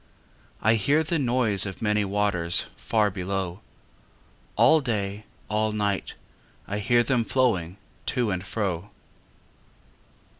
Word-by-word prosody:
I 110 - +5
hear 140 +9 +2
the 160 +1 -1
noise 120 -7 +2
of 95 - -7
many 105 -1 +1
waters 95 -4 +1
Far 105 - +1
below. 95 0 -3 0.9
All 160 -1 +5
day, 105 -4 -3 0.2
all 110 0 0
night, 105 -2 -2 0.5
I 100 +1 -3
hear 120 +3 +3
them 120 0 +1
flowing 105 -9 0 0.3
To 120 -5 0
and 90 -1 -2
fro. 100 -2 -3
105 Hz, 115 wpm, -25 LUFS, 95-120 Hz, 0.9 s, I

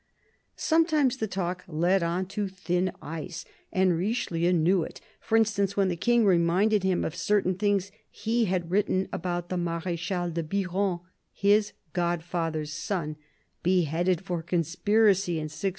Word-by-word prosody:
Sometimes 315 -5 +2
the 220 - -2
talk 180 -2 -3
led 175 +4 +2
on 170 +2 0
to 205 0 -2
thin 185 -1 -1
ice, 165 +2 -6 0.3
and 185 -2 +3
Richelieu 175 -3 0
knew 175 +2 +3
it: - - -6 0.2
for 225 - +1
instance, 205 -3 +1
when 195 -2 +3
the 175 - -1
King 235 +6 +3
reminded 190 +4 +3
him 190 -1 +1
of 160 - -4
certain 185 +2 +1
things 200 0 0 0.2
he 230 +1 0
had 180 -3 -2
written 190 -1 +1
about 175 0 -3
the 185 - -2
Marechal 175 +1 -2
de 165 +1 -2
Biron, 185 +1 -1 0.3
his 205 +1 +2 0.2
godfather's 165 -3 -2
son, 170 -3 -3 0.5
beheaded 175 0 +1
for 180 -3 -3
conspiracy 185 +3 +2
in 160 -2 -2
1602. 155 +5 -2
180 Hz, 145 wpm, -27 LUFS, 170-200 Hz, 0.5 s, and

